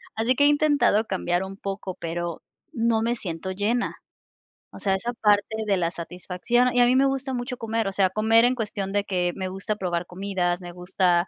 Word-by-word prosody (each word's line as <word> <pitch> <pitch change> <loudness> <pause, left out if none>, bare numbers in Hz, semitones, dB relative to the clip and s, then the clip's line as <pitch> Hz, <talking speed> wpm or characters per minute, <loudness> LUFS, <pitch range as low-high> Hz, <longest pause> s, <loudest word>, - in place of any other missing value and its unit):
Así 230 +3 +2
que 285 - +3
he - - +7
intentado 290 -7 +3
cambiar 180 -1 0
un 195 +1 -8
poco, 195 -2 -5
pero 170 0 -4 0.3
no 230 -1 +1
me 235 +1 0
siento 185 -3 -5
llena. 215 +6 -1 0.8
O - - -10
sea, 195 -1 +1
esa 235 +5 -3
parte 215 0 +1
de 195 -2 +3
la 170 -1 0
satisfacción. 180 +8 -1
Y 245 - +5
a - - +7
mí 250 - +3
me 270 +1 +5
gusta 270 0 -2
mucho 245 +1 -4
comer, 225 -2 -1
o - - -1
sea, 190 -2 +3
comer 225 +4 +4
en 250 +1 +2
cuestión 205 -4 -3
de 205 0 +1
que 180 -2 0
me 190 -1 -3
gusta 195 +3 -3
probar 175 -2 -2
comidas, 180 -1 -1
me 175 0 -8
gusta 180 0 +1
200 Hz, 210 wpm, -25 LUFS, 180-235 Hz, 0.8 s, he